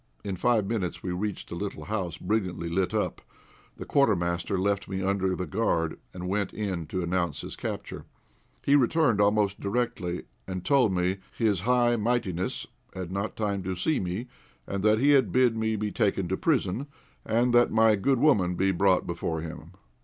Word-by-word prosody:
In 95 - -3
five 110 +2 +2
minutes 95 -5 -3
we 90 - -2
reached 100 +2 -4
a - - -3
little 100 +3 -5
house, 95 -6 -3
brilliantly 90 -5 -2
lit 90 +1 0
up. - - -1 0.6
The - - -7
Quartermaster 90 -8 +1
left 100 +1 0
me 95 0 -3
under 95 -1 +1
the 90 - -3
guard, 85 -4 0
and 90 0 -6
went 100 0 -1
in 95 -7 -3
to 90 - -2
announce 85 -2 -1
his - - -6
capture. - - -5 0.6
He 140 - +4
returned 130 -4 +3
almost 100 -1 +2
directly, 100 -5 -2 0.2
and 95 -1 -5
told 135 -7 +4
me 90 +1 0
"his 105 -5 +1
high 120 +3 +3
mightiness," 105 -6 -1 0.3
had 95 -2 -5
not 100 +3 -3
time 100 -3 -1
to 95 0 -3
see 150 - +1
me, 95 +7 -3 0.4
and 100 0 -3
that 110 +1 +4
he 140 +5 +4
had 130 -9 +4
bid 125 0 +3
me 110 0 0
be 105 0 -2
taken 100 -5 0
to 95 - +1
prison, 130 - 0 0.4
and 120 +2 +1
that 120 0 +5
my 110 -1 +5
good 130 +7 +2
woman 100 -11 +3
be 95 +2 +2
brought 95 0 +3
before 80 -2 -3
him. 80 +1 -8
100 Hz, 180 wpm, -27 LUFS, 90-115 Hz, 0.6 s, that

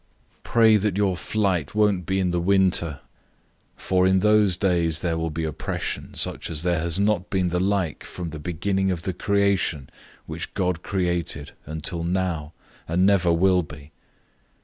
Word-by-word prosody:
013:018 - - -40
Pray 110 -2 +5
that 100 -2 -1
your 100 -3 +1
flight 95 -4 -1
won't 100 -5 +2
be 95 0 0
in 90 -2 +1
the 90 - 0
winter. 90 -5 +2 0.8
013:019 - - -18
For 95 0 +2
in 95 0 +4
those 105 -2 +3
days 85 -4 +1
there 85 -2 0
will 80 0 -2
be 80 +1 -4
oppression, 80 -3 -4
such - - -1
as 80 -1 -3
there 90 -2 +1
has 85 +3 -1
not 100 -3 +1
been 95 -2 0
the 90 +1 -1
like 95 -4 -1
from 85 -3 -7
the 80 - -7
beginning 95 +4 -1
of 90 -3 -2
the 95 - -2
creation 100 -7 0 0.3
which 80 +1 -6
God 90 -3 -1
created 85 -6 -2 0.2
until 80 +2 -3
now, 85 -4 -2 0.4
and 90 +3 +2
never 95 -3 +3
will 90 +2 +3
be. 75 -2 -12
90 Hz, 170 wpm, -24 LUFS, 85-95 Hz, 0.8 s, Pray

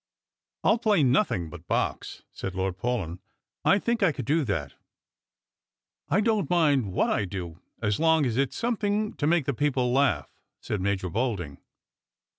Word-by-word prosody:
" - - -65
I'll 225 - +4
play 210 -9 +3
nothing 125 - +1
but - - -11
Box," - - -2
said 95 -2 -6
Lord 95 -1 -1
Paulyn; 100 -7 -2 0.2
" - - -65
I - - +4
think 235 +3 -1
I 190 -4 +4
could 130 -4 -6
do 155 +4 +2
that." 80 - -2 0.7
" - - -66
I 195 - +3
don't 215 -8 +1
mind 145 - +2
what - - +1
I 105 - +1
do, 90 -3 -6 0.2
as 105 -2 +1
long 160 -2 +4
as 120 -3 -1
it's 135 0 0
something 215 -2 0
to 145 - -1
make 165 -3 +2
the 140 - 0
i^eople 130 -2 0
laugh," 125 - +1 0.3
said 105 - -3
Major 95 -2 -1
Bolding. 100 - -2
130 Hz, 175 wpm, -27 LUFS, -, 0.7 s, I'll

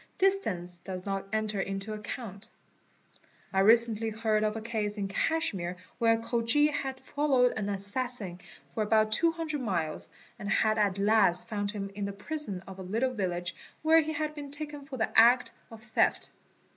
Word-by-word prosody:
Distance 200 - +1
does 185 0 -7
not 195 -1 -3
enter 215 -2 0
into 195 +2 -4
account. 210 -1 -7 1.0
I 190 - +2
recently 225 +1 +4
heard 220 -1 0
of 215 0 0
a - - -2
case 215 -2 -2
in 200 -1 -1
Cashmere 195 - -1 0.2
where 230 -1 +5
a - - +1
Khoji 235 +6 +2
had 270 -3 -3
followed 270 -5 +2
an 205 -2 -2
assassin 200 -2 -3 0.3
for 220 - -1
about 215 0 +3
200 325 +1 +1
miles 170 -9 -2 0.3
and 205 - -4
had 215 0 +2
at 200 -2 +2
last 200 -2 +3
found 205 -3 -2
him 200 -2 -4
in 200 0 -3
the 200 - -4
prison 200 -3 -5
of 190 0 -9
a - - -5
little 225 +8 -1
village 175 -5 -2 0.3
where 320 +1 +6
he 315 +1 -3
had 305 0 -2
been 290 -2 -7
taken 295 -1 -7
in 260 - -4
the 220 - 0
act 240 +2 +6 0.2
of 225 -1 -12
theft. 220 -2 +1
220 Hz, 170 wpm, -29 LUFS, 195-255 Hz, 1.0 s, where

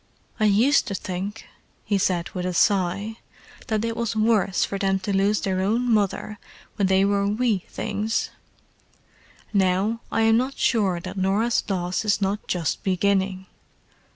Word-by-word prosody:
I 215 - +3
used 220 +8 +4
to 200 - -3
think," 190 +4 -5 0.4
he 200 -2 +1
said 180 -2 0
with 180 -1 -3
a 180 - -3
sigh, 200 +3 +1 0.5
"that 220 -2 0
it 230 0 -2
was 230 -1 -2
worse 215 -3 +2
for 200 - -4
them 195 -1 +1
to 195 +1 -2
lose 200 +2 +2
their 185 -1 -1
own 235 +5 +1
mother 210 +1 -1 0.4
when 200 -3 +1
they 190 +1 +3
were 200 0 +1
wee 210 -2 0
things; 215 +2 -2 1.2
now, 195 +4 +1
I 225 - +1
am 225 0 +4
not 260 +3 -1
sure 200 -7 +1
that 170 - -8
Norah's 200 +5 +1
loss 180 +1 -1
is 210 -1 +1
not 200 +1 -2
just 170 -4 -1
beginning. 190 0 0
200 Hz, 155 wpm, -24 LUFS, 190-220 Hz, 1.2 s, used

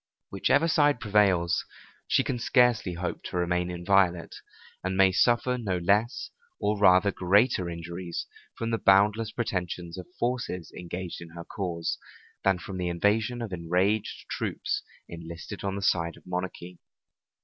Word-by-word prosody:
Whichever 140 +10 +2
side 145 -4 +3
prevails, 100 -6 +2 0.4
she - - +3
can 125 -3 -2
scarcely 120 -6 +3
hope 90 +1 -4
to - - -4
remain 90 0 0
inviolate, 90 0 +1 0.5
and 95 0 -2
may 95 -1 +6
suffer 120 +5 +2
no 95 -6 -1
less, 100 +7 +1 0.3
or 105 0 0
rather 100 0 +5
greater 95 0 +2
injuries 85 +1 -5 0.3
from 115 0 -2
the 115 - 0
boundless 105 +3 +4
pretensions 90 -6 -3
of 90 - -9
forces 120 -9 -2
engaged 90 0 -6
in 85 - -9
her 85 0 -7
cause, 85 -5 -3 0.4
than 95 -1 +3
from 95 +1 -7
the 90 - -1
invasion 110 +7 +1
of 105 -5 -6
enraged 90 +5 0
troops - - -2 0.3
enlisted 85 +3 -8
on 100 -1 -2
the 100 - -4
side 85 -2 +1
of - - -19
monarchy. 90 -1 -5
95 Hz, 145 wpm, -27 LUFS, 90-105 Hz, 0.5 s, may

